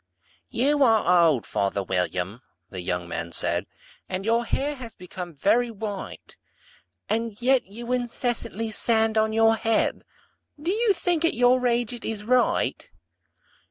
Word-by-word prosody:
"YOU 285 +5 +1
are 180 -9 +5
old, 140 -8 +1
father 100 0 -1
William," 90 +4 -2 0.3
the 95 - -5
young 90 0 -3
man 85 0 -4
said, - - 0 0.4
"And 190 +1 -3
your 230 +1 +2
hair 285 +5 -1
has 235 -3 -9
become 180 -1 -8
very 230 - +2
white; 205 -3 -7 0.7
And 225 -1 -2
yet 255 +1 +3
you 235 +5 -7
incessantly 235 -2 -2
stand 225 -1 +1
on 220 0 +2
your 225 0 +4
head 225 0 0 0.6
Do 330 +5 -1
you 440 0 +2
think, 345 -2 0
at 330 - +2
your 250 +1 +4
age, 240 -1 0
it 240 - -8
is 215 -2 -3
right? 250 - +1
225 Hz, 145 wpm, -25 LUFS, 185-245 Hz, 0.7 s, are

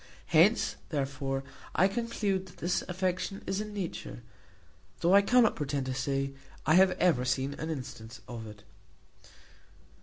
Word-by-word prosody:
Hence, - - +4
therefore, 135 -1 -2 0.3
I 185 - +5
conclude 200 -3 -1
that 180 - -15
this 175 +2 0
affection 185 +2 -2
is 195 +2 -1
in 210 0 -6
nature, 185 -11 -5 0.8
though 175 +2 +4
I 200 - +8
cannot 240 +2 +4
pretend 140 -2 -2
to 130 - -2
say 135 +1 -1 0.3
I 155 - +4
have 185 +1 +6
ever 165 -8 +2
seen 130 +2 0
an 160 - -3
instance 120 -5 -6
of 115 -2 -7
it. 105 -1 -12
160 Hz, 145 wpm, -30 LUFS, 135-190 Hz, 0.8 s, I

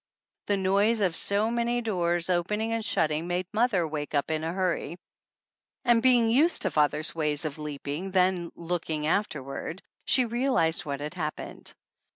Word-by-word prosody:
The 205 - +2
noise 200 +4 +2
of 180 -4 +1
so 205 +5 +1
many 235 0 0
doors 175 -6 0
opening 210 +6 0
and 230 -1 -1
shut 160 -6 +2
ting 155 +3 -2
made 180 +1 -1
mother 215 -7 +2
wake 150 -1 -4
up 145 +2 0
in 155 0 -1
a 165 - -2
hurry, 175 -3 -2 0.9
and, 240 -2 +4
be 255 0 +5
ing 230 -1 +2
used 305 +9 +3
to - - 0
father's 150 +1 +1
ways 150 -1 +2
of 155 0 -4
leaping, 150 +4 -5
then 185 -2 +1
look 170 0 -4
ing 155 -1 -2
afterward, 155 -1 -2 0.2
she 255 - +3
realized 235 -9 +1
what 140 -1 -4
had 150 +3 -5
happened. 155 -4 -5
175 Hz, 175 wpm, -27 LUFS, 155-220 Hz, 0.9 s, be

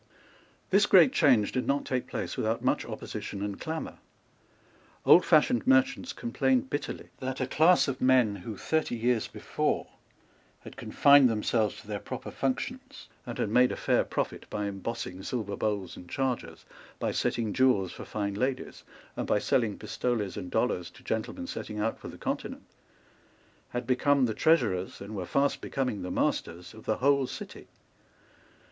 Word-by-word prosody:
This 200 +2 +5
great 170 -9 +7
change 115 -7 +4
did 130 - -2
not 140 +1 +1
take 130 -1 -2
place - - -4
without - - -1
much - - +1
opposition 100 - -6
and 100 -1 -4
clamour. 160 0 -5 1.1
Oldfashioned 250 0 +5
merchants 270 -1 +3
complained 130 +1 0
bitterly 145 - -4
that 130 0 -4
a 130 - 0
class 160 +7 +4
of 130 -2 -3
men 125 -5 +4
who, 100 +3 -7
thirty 160 -1 -1
years 120 -1 +1
before, - - -2 0.8
had - - -11
confined 140 -2 +5
themselves 110 -1 0
to 100 - -15
their 105 -1 -3
proper - - -7
functions, 260 - -4 0.2
and 120 - -5
had - - -1
made 125 +3 +4
a - - -2
fair - - +2
profit - - -4
by 105 0 -3
embossing 100 -1 -5
silver 100 -2 -3
bowls 100 -4 -2
and 90 - -12
chargers, 130 +1 -3 0.3
by - - -1
setting 110 -3 -1
jewels 125 -9 +3
for - - -9
fine 100 -1 -3
ladies, 130 +5 -3 0.3
and - - -3
by - - +3
selling 115 -5 +1
pistoles 110 -2 -2
and 90 - -6
dollars 90 0 0
to - - -18
gentlemen 110 - -3
setting 110 - -6
out 110 +2 -1
for - - -9
the - - -9
Continent, - - -4 1.1
had 120 0 -4
become 135 +2 +3
the 110 - -1
treasurers, 105 - +1
and 100 +2 -8
were 90 -3 -4
fast 140 0 +1
becoming 125 -7 -2
the 90 - -4
masters, 90 +3 -2
of 110 - -13
the 110 - 0
whole 140 0 +3
City. - - -9
120 Hz, 160 wpm, -29 LUFS, 105-135 Hz, 1.1 s, great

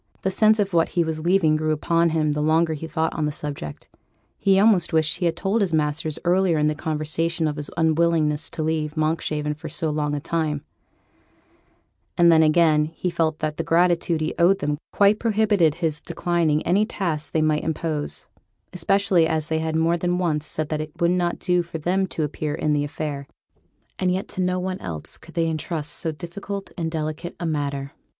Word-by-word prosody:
The 190 - +1
sense 215 +2 +4
of 200 -3 0
what 165 -1 +3
he 170 - +5
was 160 -1 -3
leaving 170 -3 +3
grew 155 0 -1
upon 165 +2 +2
him 155 -2 +1
the 150 0 -1
longer 160 +2 +2
he 155 +1 -6
thought 160 0 -1
on 155 - -1
the - - -1
subject; 145 - -6 0.5
he 195 -1 +3
almost 200 -5 +4
wished 160 -1 +2
that - - -7
he 180 - 0
had 165 - 0
told 195 +5 0
his 185 -4 0
masters 155 +1 -1
earlier 180 -1 +3
in 150 - +2
the 150 - +2
conversation 160 +2 -1
of 150 - -2
his 145 -1 -5
unwillingness 160 -2 +2
to 160 - -4
leave 155 -1 -2
Monkshaven 155 -1 -1
for 155 +1 -8
so 160 0 -2
long 150 -1 -1
a - - -2
time; 150 -1 -2 1.5
and 170 -1 +6
then 160 -1 +6
again 155 -1 +4
he 165 +3 -4
felt 160 -2 0
that 155 -1 -2
the - - -1
gratitude 170 -1 +2
he 155 - -1
owed 180 +3 +5
them 150 -3 -2
quite 205 +1 +4
prohibited 205 -8 +2
his 160 -3 -2
declining 170 -3 0
any 190 +5 +3
task 170 -8 -3
they 155 - +1
might 155 -1 +1
impose, 160 -2 -3 0.5
especially 185 -1 +2
as 155 -2 -1
they 160 0 0
had 160 0 -2
more 165 +2 +2
than 175 +1 0
once 155 -4 -1
said 155 -1 -3
that 155 -1 -1
it 155 +2 -9
would 170 -1 +3
not 175 -1 0
do 180 -1 +1
for 170 -1 -6
them 185 +4 0
to 160 - -3
appear 150 0 -3
in 155 -1 0
the 145 -1 +1
affair, 145 -1 -4 0.7
and 185 -1 +1
yet 185 +2 -2
that - - -10
to 185 - -2
no 180 0 +1
one 185 0 -3
else 80 -4 -5
could - - -16
they 165 -1 +1
entrust 155 -1 -3
so 160 - -1
difficult 195 +5 -7
and 165 -3 -2
delicate 155 +1 -4
a 175 - -3
matter. 140 -3 -2
160 Hz, 205 wpm, -23 LUFS, 155-175 Hz, 1.5 s, and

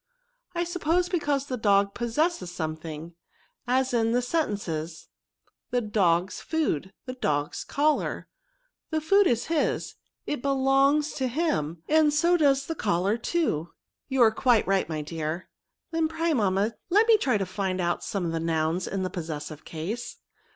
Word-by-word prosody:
" - - -48
I 345 - +1
suppose 350 0 0
because 290 -6 0
the 255 -3 -3
dog 200 -2 +3
possesses 240 - -1
something; 160 0 -5 0.5
as, 260 +1 +1
in 225 -1 +2
the 245 +1 +2
sentences, 195 - -2 0.4
^ - - -35 0.2
the 245 - +1
dog's 190 -5 +1
food,' 190 - -1
' - - -60
the 255 - -5
dog*s 150 - -1
collar: 300 +1 0 0.3
' - - -48
the 315 - 0
food 395 +5 +4
is 235 -1 +1
his; 325 -1 0 0.3
it 295 - -3
belongs 275 +2 +3
to 260 -2 -1
him, 230 - -1
and 310 -1 +4
so 335 +4 +3
does 275 -4 +3
the 325 - -3
collar 200 - +1
too." 230 - -1 0.2
*' - - -62
You 265 -2 +4
are 220 - +6
quite 240 0 +3
right, 195 -3 +1
my 155 -2 -3
dear." 160 +2 -4 0.2
*' - - -57
Then 325 -1 +1
pray, 325 +1 0
mamma, 205 -2 +1 0.2
let 415 +5 +5
me 455 - +7
try 255 - +1
to 195 - -1
find 185 0 -2
out 175 -1 0
some 180 -5 -2
nouns 165 +2 0
in 195 -1 -2
the 185 - -3
possessive 155 -3 -6
case. 185 +10 -5
235 Hz, 170 wpm, -27 LUFS, -, 0.5 s, me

